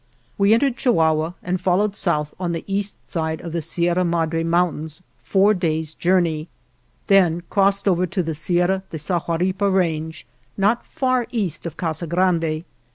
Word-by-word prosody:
We 200 +2 +4
entered 265 +1 +1
Chihuahua 160 - +2
and 180 +1 -2
followed 195 +3 +1
south 150 -6 -1
on 175 -2 -2
the 165 - -4
east 200 0 -3
side 160 -2 -2
of 170 - -6
the 170 0 -2
Sierra 175 +3 +1
Madre 165 -1 0
Mountains 165 -1 -1 0.2
four 200 +2 +3
days' 160 -4 -2
journey; 170 -3 +1 0.6
then 175 -4 +3
crossed 200 0 +2
over 180 -1 +2
to 190 0 -1
the 160 0 -3
Sierra 175 +4 +1
de 160 - -5
Sahuaripa 180 +4 0
range, 160 -4 -1 0.3
not 210 +5 +1
far 255 -2 0
east 195 - -2
of 165 - -8
Casa 165 0 -2
Grande. 165 -2 +1
175 Hz, 155 wpm, -21 LUFS, 160-195 Hz, 0.6 s, We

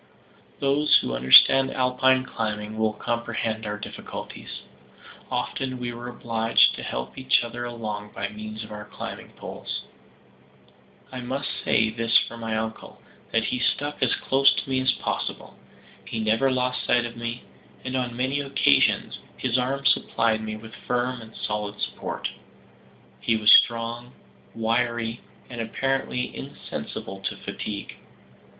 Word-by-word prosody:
Those 140 +2 +4
who 60 - -3
understand 65 - +7
Alpine 130 0 +3
climbing 110 -3 -3
will 110 -1 +1
comprehend 115 -1 -2
our 105 0 -2
difficulties. - - -8 0.7
Often 130 -1 -2
we 120 -1 -4
were 120 +1 -7
obliged 115 -2 +3
to - - -6
help 60 +1 -4
each 130 -2 +3
other 120 +1 -5
along 105 -3 -5
by - - -3
means 110 +1 -7
of 110 - -11
our 105 0 -7
climbing - - -7
poles. - - -6 1.3
I 130 - -5
must 130 +3 -3
say 110 0 +3
this 115 0 +3
for 115 - 0
my 115 -1 -2
uncle, 110 0 -5 0.3
that 115 - +2
he 125 - -1
stuck 145 +4 -1
as 130 - +3
close 135 +1 +4
to - - -3
me 130 -1 +1
as 130 0 +3
possible. - - -4 0.5
He 115 - -4
never 110 +5 +3
lost 125 0 0
sight 120 0 +3
of 120 - -6
me, 120 +1 -5 0.4
and 130 0 -2
on 125 -2 -2
many 130 +3 0
occasions 135 - +3 0.2
his 130 -1 +1
arm 135 +2 -1
supplied 115 -1 +2
me 110 0 -4
with 110 +1 -11
firm 125 0 -1
and 110 0 -13
solid 105 -1 -3
support. - - -3 0.9
He 115 - +2
was 110 -1 +5
strong, 120 +1 +4 0.4
wiry, 115 0 0 0.3
and 120 -2 -5
apparently 135 +2 -1
insensible 95 +1 -6
to 95 - -3
fatigue. 100 -2 -6
115 Hz, 145 wpm, -25 LUFS, 110-125 Hz, 1.3 s, understand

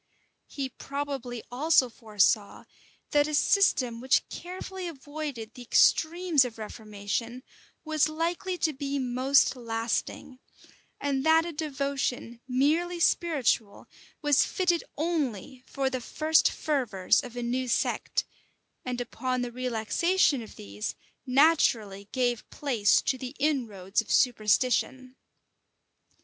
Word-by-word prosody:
He 275 -2 -4
probably 270 -3 -5
also 275 +1 +3
foresaw, 215 -2 0 0.5
that 290 -1 +3
a 305 - -1
system 255 - +2
which 260 +1 +2
carefully 370 +1 -7
avoided 290 -6 -6
the 250 - -11
extremes 320 +5 +3
of 240 -3 -6
reformation, 220 +3 -5 0.4
was 310 -1 +2
likely 340 +3 -2
to 315 -3 0
be 280 +1 -3
most 260 +2 +2
lasting; 230 +2 -3 0.6
and 275 -2 -1
that 320 +1 +4
a 345 - -4
devotion, 275 -5 -3
merely 315 +7 +1
spiritual, 290 - +1 0.4
was 290 -2 +4
fitted 350 -3 0
only 275 - -2
for 275 -1 -2
the 260 -1 -2
first 310 +5 +2
fervors 245 -11 +1
of 245 -1 -9
a 245 - -3
new 250 +2 -1
sect, 235 - 0 0.6
and 250 -1 -3
upon 250 +1 -2
the 245 - -4
relaxation 255 - +1
of 220 - -11
these 100 +1 -6 0.3
naturally 240 -8 +2
gave 245 -3 -1
place 240 -8 +2
to 260 - -1
the 255 +2 -7
inroads 230 -10 0
of 225 - -16
superstition. 255 +2 +1
260 Hz, 115 wpm, -28 LUFS, 235-305 Hz, 0.6 s, that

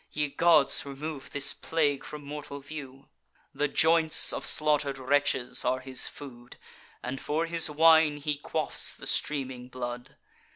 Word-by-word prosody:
Ye 150 -1 -3
gods, 160 -2 +3
remove 140 0 -8
this 140 -1 +2
plague 145 -4 -1
from 150 -1 -10
mortal 145 -1 -8
view! 135 -2 -11 0.5
The 145 - -1
joints 160 +2 +4
of - - -1
slaughter'd 150 -3 +3
wretches 130 -1 0
are 130 +1 0
his 130 0 0
food; 120 -4 -12 0.5
And 130 +2 -5
for 160 +3 -2
his 165 -1 +1
wine 160 0 +4
he 145 0 -3
quaffs 150 0 -1
the - - -12
streaming 130 -4 -1
blood. 125 +1 -8
145 Hz, 140 wpm, -27 LUFS, 130-155 Hz, 0.5 s, joints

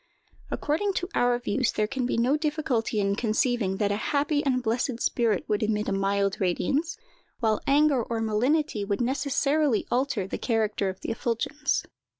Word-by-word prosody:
According 360 +7 -1
to 355 - -2
our 245 0 +2
views, 245 +1 0
there 215 - +1
can 250 +2 -2
be - - -1
no 245 +5 +3
difficulty 295 -8 -1
in 200 0 +1
conceiving 220 -3 0
that 205 -1 +1
a 205 - 0 0.2
happy 290 +1 +1
and 255 -3 +1
blessed 235 +1 -1
spirit 230 -6 +1
would 210 -1 0
emit 215 -1 0
a - - 0
mild 195 0 0
radiance; 275 - 0 0.4
while 220 -3 +1
anger 285 -2 +4
or 230 0 -3
malignity 225 +3 +1
would 200 0 -1
necessarily 280 0 +1
alter 255 -5 0
the 190 - -5
character 215 -4 0
of 185 - -7
the - - -3
effulgence. 235 +6 -1
235 Hz, 165 wpm, -26 LUFS, 210-280 Hz, 0.4 s, anger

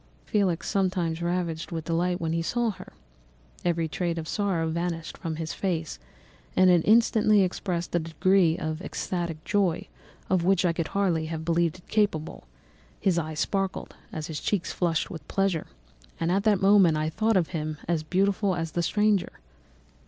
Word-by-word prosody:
"Felix 190 -5 0
seemed 180 -4 0
ravished 170 -2 -2
with 165 -2 -4
delight 175 +2 0
when 165 -1 -1
he 165 - 0
saw 235 +6 0
her, 185 -2 -12 0.7
every 170 -2 +1
trait 170 +3 -2
of 160 -1 -4
sorrow 185 -5 0
vanished 165 0 -3
from 165 -3 -4
his 160 0 -4
face, 165 - -2 0.6
and 185 0 +6
it 175 -2 +5
instantly 215 -2 +5
expressed 180 -1 -2
a 175 - +3
degree 170 +1 +2
of 155 +1 -3
ecstatic 170 -5 -4
joy, 195 -5 +1 0.4
of 185 -2 +2
which 190 0 +3
I 170 - +3
could 165 -2 -2
hardly 175 -5 0
have 160 0 -5
believed 170 0 +1
it 180 - -20
capable; 200 - -1 0.5
his 180 -3 +2
eyes 155 -2 -3
sparkled, 195 -1 -2 0.2
as 155 -1 -4
his 155 -2 -5
cheek 195 +1 -1
flushed 165 -3 -1
with 160 -3 -8
pleasure; 195 -5 0 0.5
and 165 +1 0
at 195 +3 +1
that 205 -3 +3
moment 195 -5 +6
I 155 0 0
thought 220 +4 +2
him 155 -2 -3
as 170 -2 +1
beautiful 195 +3 +1
as 165 -2 -3
the 175 - -1
stranger. 210 +2 +1
175 Hz, 165 wpm, -27 LUFS, 165-195 Hz, 0.7 s, and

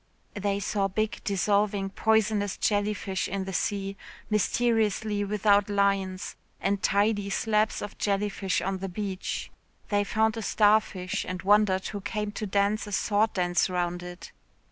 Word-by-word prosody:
They 200 -1 -1
saw 200 -1 0
big, 215 +3 -2
dissolving, 200 0 +1
poisonous 215 -2 +1
jellyfish 205 -2 0
in 195 0 -3
the 190 - -5
sea, 195 0 -2 0.3
mysteriously 215 -1 +1
without 205 0 +2
lines 195 -2 0 0.2
and 200 0 0
tidy 205 0 +1
slabs 215 +2 +1
of 205 - -8
jellyfish 200 -2 0
on 195 -1 -2
the 195 +1 -4
beach. 190 0 -4 0.4
They 205 -1 +2
found 220 +2 +1
a - - -3
starfish, 205 -3 +2
and 185 -1 -5
wondered 200 -1 +3
who 205 -1 -5
came 210 +1 -3
to 210 0 -4
dance 200 +2 +1
a - - -7
sword 210 +2 +1
dance 175 0 +1
round 175 -1 -1
it. 175 -1 -9
205 Hz, 145 wpm, -27 LUFS, 195-210 Hz, 0.4 s, wondered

